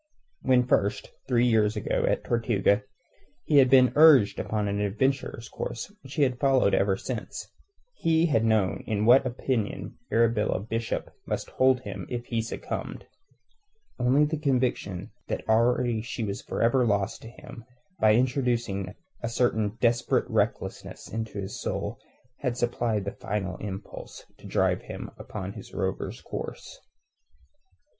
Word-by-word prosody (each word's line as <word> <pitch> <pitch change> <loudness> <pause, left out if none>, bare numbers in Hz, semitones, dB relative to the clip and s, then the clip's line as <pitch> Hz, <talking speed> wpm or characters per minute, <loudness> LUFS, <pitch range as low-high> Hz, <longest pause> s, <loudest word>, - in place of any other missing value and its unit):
When 125 -1 +4
first, 100 -4 +1 0.2
three 120 -2 +3
years 110 -3 +3
ago, - - 0
at - - 0
Tortuga 110 -3 +2 0.6
he 150 - +3
had 130 -2 +7
been 130 -1 +6
urged 145 -9 +7
upon 105 -1 -1
the 100 0 -1
adventurer's 115 +2 -1
course 205 - -5
which - - -10
he 150 - +3
had 130 -2 0
followed 135 -7 +3
ever 95 -1 +2
since, 120 0 -6 0.4
he 165 - +2
had 135 -9 +2
known 110 -4 +1
in 105 -1 0
what 130 +3 +6
opinion 120 -3 -3
Arabella 115 -3 +2
Bishop 115 +3 -3 0.2
must - - -3
hold 130 -1 +3
him 100 -5 -7
if 120 -1 -4
he 115 -2 -1
succumbed. 115 - -5 0.9
Only 130 +4 +4
the 155 0 -2
conviction 125 - -1 0.2
that - - -4
already 115 0 +2
she 115 0 -4
was 100 -2 -3
for - - -2
ever 125 +2 +4
lost 105 -1 0
to 115 - -9
him, 120 0 -12 0.4
by 110 0 +5
introducing 120 -6 0 0.3
a 115 - -2
certain 110 -3 0
desperate 120 0 +2
recklessness - - -2
into 110 -2 -4
his 95 +1 -5
soul - - -3 0.4
had 125 -3 -2
supplied 120 -4 0
the 100 - -2
final 95 -3 -3
impulse 95 -1 -8
to - - -11
drive - - +1
him - - -8
upon 100 -2 -6
his 110 -3 -11
rover's 95 -1 -3
course. - - -7
115 Hz, 145 wpm, -27 LUFS, 105-125 Hz, 0.9 s, had